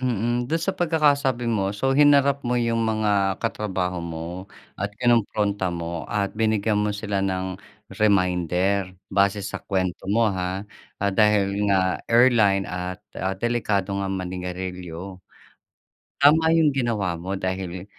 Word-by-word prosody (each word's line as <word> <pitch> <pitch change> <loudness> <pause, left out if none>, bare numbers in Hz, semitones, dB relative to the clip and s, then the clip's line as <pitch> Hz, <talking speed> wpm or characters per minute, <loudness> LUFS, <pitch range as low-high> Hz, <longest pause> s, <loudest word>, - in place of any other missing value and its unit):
mm. 120 0 -1
Do'n 165 +1 0
sa 195 - 0
pagkakasabi 145 -7 +2
mo, 100 -4 0
so 135 +6 +1
hinarap 140 -1 +5
mo 125 0 0
'yong 115 -1 +1
mga 105 -3 +1
katrabaho 95 -5 -2
mo 85 +3 -6 0.3
at 100 - 0
kinompronta 105 -5 +1
mo 85 0 -4
at 100 -2 -1
binigyan 110 -1 +1
mo 105 - 0
sila 100 -2 -2
ng 95 -1 -2 0.4
reminder 90 -1 +1 0.2
base 100 +1 +2
sa 100 - -5
kuwento 95 -3 -2
mo, 115 +2 +3
ha. 95 +1 -3 0.4
Dahil 100 0 +2
nga 95 -2 +1
airline 115 -5 +4
at, 90 0 -5 0.2
ah, 95 +1 -2
delikado 105 -3 -1
nga 100 - -2
manigarilyo. 90 -1 -5 1.0
Tama 160 +3 +5
'yong 160 -3 +4
ginawa 110 -9 0
mo 95 +3 -4
dahil, 95 -1 -4
100 Hz, 130 wpm, -24 LUFS, 95-115 Hz, 1.0 s, hinarap